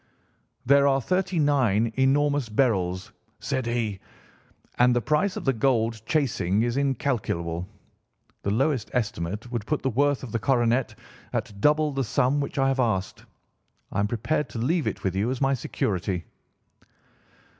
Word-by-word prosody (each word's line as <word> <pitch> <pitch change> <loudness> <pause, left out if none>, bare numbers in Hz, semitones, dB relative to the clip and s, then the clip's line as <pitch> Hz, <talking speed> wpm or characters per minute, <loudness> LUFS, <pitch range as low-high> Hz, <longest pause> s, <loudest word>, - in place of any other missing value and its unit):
'There 140 +2 +5
are 135 -1 +3
thirty 185 +5 -1
nine 120 -7 +2
enormous 140 -1 +2
beryls,' 95 -6 0 0.3
said 130 -2 -2
he, 115 -5 -1 0.8
'and 125 0 +5
the - - +3
price 155 - +1
of - - -6
the 135 - +3
gold 115 -3 +1
chasing 110 - +1
is 120 0 -1
incalculable. 110 -11 -1 0.7
The - - -2
lowest 125 +2 0
estimate 105 -1 -3
would 115 -4 -3
put 150 - -1
the 135 - +1
worth 140 +3 +1
of 125 - -7
the 115 - -1
coronet 120 0 +1 0.4
at 100 -1 -4
double 150 0 +3
the 135 -1 -1
sum 130 +4 +1
which 140 - -5
I 135 -1 +3
have 135 0 0
asked. 100 -6 -1 0.7
I 95 - -2
am 100 - +2
prepared 120 +7 -1
to - - -7
leave 155 +8 0
it - - -3
with 95 -2 -1
you 100 +5 0
as 130 -1 -2
my 135 0 +2
security. 95 -7 -2
125 Hz, 155 wpm, -25 LUFS, 105-140 Hz, 0.8 s, There